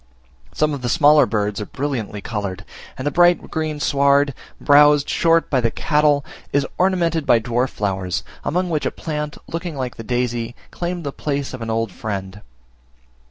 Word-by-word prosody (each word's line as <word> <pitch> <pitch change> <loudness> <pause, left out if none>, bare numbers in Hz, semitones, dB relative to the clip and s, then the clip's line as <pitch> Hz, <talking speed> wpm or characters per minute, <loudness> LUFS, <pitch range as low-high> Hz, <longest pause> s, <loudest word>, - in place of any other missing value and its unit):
Some 150 -1 0
of 140 - -5
the 120 - -2
smaller 145 +1 +5
birds 105 -1 -1
are 105 - -5
brilliantly 125 -8 -4
coloured; 100 -4 -4 0.3
and 130 - -5
the 145 - +1
bright 175 +1 +3
green 155 -2 -2
sward, 140 0 +3 0.3
browsed 145 0 +5
short 165 0 +2
by 130 -3 +3
the 115 - +2
cattle, 150 +2 +2 0.3
is 140 -1 +2
ornamented 175 -4 +2
by 120 - +5
dwarf 120 +3 0
flowers, 95 -3 -2 0.2
among 180 +3 -1
which 155 -2 0
a - - +1
plant, 150 -2 -5
looking 170 -1 -5
like 130 -2 -4
the 115 - -7
daisy, 120 -1 -2 0.2
claimed 175 0 -4
the 140 - -3
place 140 -1 -3
of 130 - -7
an 115 - -4
old 115 -1 -1
friend. 95 +1 -5
140 Hz, 170 wpm, -21 LUFS, 115-150 Hz, 0.3 s, smaller